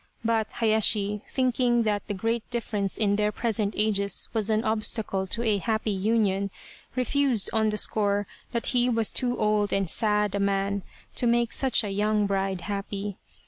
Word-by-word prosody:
But 225 -1 0
Hayashi, 210 -2 +2
thinking 250 -2 +2
that 210 -2 -1
the 205 - -3
great 225 +4 -2
difference 210 -5 -2
in 205 -2 +2
their 210 0 +1
present 215 -2 -1
ages 200 -2 +1
was 220 -2 0
an 220 0 +2
obstacle 215 -3 -1
to 235 +5 -2
a 215 -3 +2
happy 220 0 -1
union, 200 -1 +1 0.5
refused 255 -3 +1
on 220 -1 +2
the 210 - -2
score 205 -1 +1 0.3
that 235 -1 -1
he 245 0 +3
was 225 -3 +1
too 245 -1 -1
old 210 -1 +1
and 195 -1 +1
sad 210 +1 +1
a 200 - -1
man 200 0 0 0.3
to 245 - +1
make 235 0 +2
such 260 -4 +2
a 205 - -3
young 210 +1 +1
bride 195 -2 -1
happy. 200 +1 -4
215 Hz, 170 wpm, -26 LUFS, 200-230 Hz, 0.5 s, he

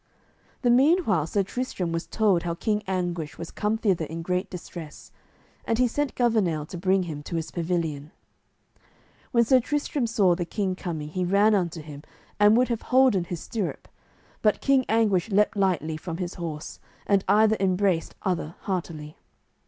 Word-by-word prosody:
The 245 - +4
meanwhile 255 - +3
Sir 200 +4 +1
Tristram 195 -5 -3
was 165 0 -3
told 205 -6 +2
how 170 -1 -3
King 210 +3 -1
Anguish 175 -4 -2
was 165 - -7
come 210 +1 -1
thither 190 -7 +1
in 165 +2 -6
great 180 +2 -1
distress, 170 -4 -9 0.5
and 225 - 0
he 250 0 +4
sent 290 +3 -2
Gouvernail 205 -11 +1
to 180 - -6
bring 190 +1 +2
him 155 -4 -6
to 155 - -6
his 165 -1 -3
pavilion. 165 -4 -2 1.2
When 235 -1 +4
Sir 260 +2 +5
Tristram 285 0 -1
saw 200 -6 +3
the 175 +1 -2
king 190 +1 -2
coming 160 -5 -5
he 185 +3 -2
ran 200 +4 +4
unto 170 -5 -1
him 145 -2 -9 0.4
and 210 +2 +6
would 250 +1 +3
have 235 -2 -1
holden 250 -8 +4
his 175 -1 -5
stirrup, 215 -6 -4 0.5
but 210 -2 +2
King 270 -2 +3
Anguish 220 -3 +2
leaped 210 +2 +2
lightly 175 -6 0
from 165 +1 -6
his 180 -1 -4
horse, 160 -4 -6 0.3
and 200 -2 +2
either 220 +1 +5
embraced 185 -2 +1
other 170 -3 -2
heartily. 160 -5 -4
185 Hz, 170 wpm, -26 LUFS, 170-220 Hz, 1.2 s, and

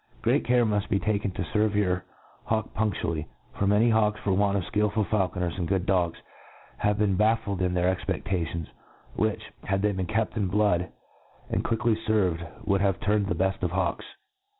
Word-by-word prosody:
Great - - +3
care 120 -1 +3
muft 105 -2 0
be 100 - +2
taHcn 105 -2 0
to - - -2
ferve 105 +3 0
your 90 -3 +1 0.4
hawk 110 -1 -1
punftually 95 -7 -1
j 80 - -9 0.3
for 100 - 0
many 105 +4 +4
hawks, 105 -1 +2
for 100 - +1
want 100 +1 +2
of 95 - -1
fkilful 105 +2 0
faulconer^ 90 -4 -1
and 90 -3 -2
good 95 0 0
dogs, 90 -4 +1 0.6
have 105 0 +1
been 105 -2 +2
baffled 105 -2 +1
in 90 -1 +1
their 90 +1 +2
expe&ations, 85 -3 -2 0.5
which, - - 0 0.2
had 95 0 0
they 105 - +3
been 95 -2 -3
kept 110 +1 -1
in 105 -4 0
blood, 90 -2 +2 0.6
and - - 0
quickly 115 0 +1
fcrved, 95 -7 -1
would 100 -1 +2
have 100 -1 +1
turned 105 -2 +1
the 90 - 0
bell 95 +3 +1
of 90 - 0
hawks. 90 0 -1
100 Hz, 185 wpm, -27 LUFS, 90-105 Hz, 0.6 s, many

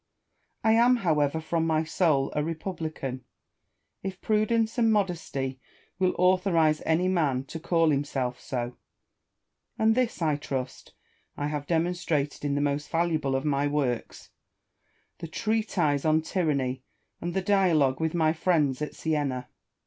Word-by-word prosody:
I 220 - +4
am, 240 +3 +5
however, 160 - +1
from 165 +1 -1
my 160 -1 +2
soul 155 -4 +1
a 150 - +1
republican, 160 -6 -4 0.8
if 190 -1 -5
prudence 220 +2 +1
and 225 -1 +4
modesty 165 -10 -1 0.4
will 185 -1 +2
authorise 180 -4 +3
any 165 +3 +2
man 150 -8 +1
to 160 +4 -8
call 165 -1 +2
him 140 0 +1
self 125 -3 -3
so; 120 -1 -4 1.0
and 220 0 +4
this, 245 -3 0
I 155 -4 +1
trust, 135 -3 -5 0.4
I 145 0 -2
have 145 -1 -4
demonstrated 165 -4 -1
in 145 -1 0
the 145 - 0
most 145 +1 -1
valuable 160 -5 0
of 135 - -1
my 145 -1 +1
works, 135 -5 -2 0.9
the 165 - -6
Treatise 190 -7 0
on 155 0 +3
Tyranny 140 -8 -1 0.4
and 175 0 -4
the 190 - +1
Dialogue 175 -10 +3
with 160 +1 0
my 160 -2 +3
friends 155 -6 +1
at 150 - -4
Siena. 140 -5 -2
160 Hz, 140 wpm, -27 LUFS, 140-180 Hz, 1.0 s, am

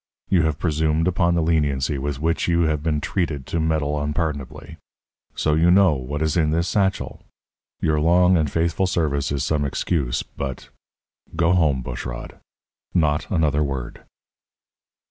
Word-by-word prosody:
You 90 -3 +4
have 80 -2 0
presumed 80 0 0
upon 85 -1 +2
the 85 - +1
leniency 70 -4 0
with 70 0 -3
which 80 +2 0
you 85 0 +2
have 80 -3 +1
been 75 -1 -1
treated 75 -6 -2
to 85 - -2
meddle 75 -2 0
unpardonably. 75 -1 -4 0.6
So 75 - +1
you 80 +3 +3
know 95 -2 +5
what 70 +3 -3
is 80 -2 0
in 80 -3 +2
this 85 +3 0
satchel! 95 -2 -1 0.6
Your 80 -1 +1
long 90 +3 +4
and 80 -4 +1
faithful 85 +3 0
service 70 -6 -1
is 70 -2 -1
some 75 +1 0
excuse, 70 -2 -1
but 65 -2 -7 0.7
go 85 +1 +2
home, 75 -8 +2
Bushrod - - -7 0.6
not 75 -3 +1
another 75 -5 +1
word!" 65 -4 -5
80 Hz, 150 wpm, -22 LUFS, 70-85 Hz, 0.7 s, know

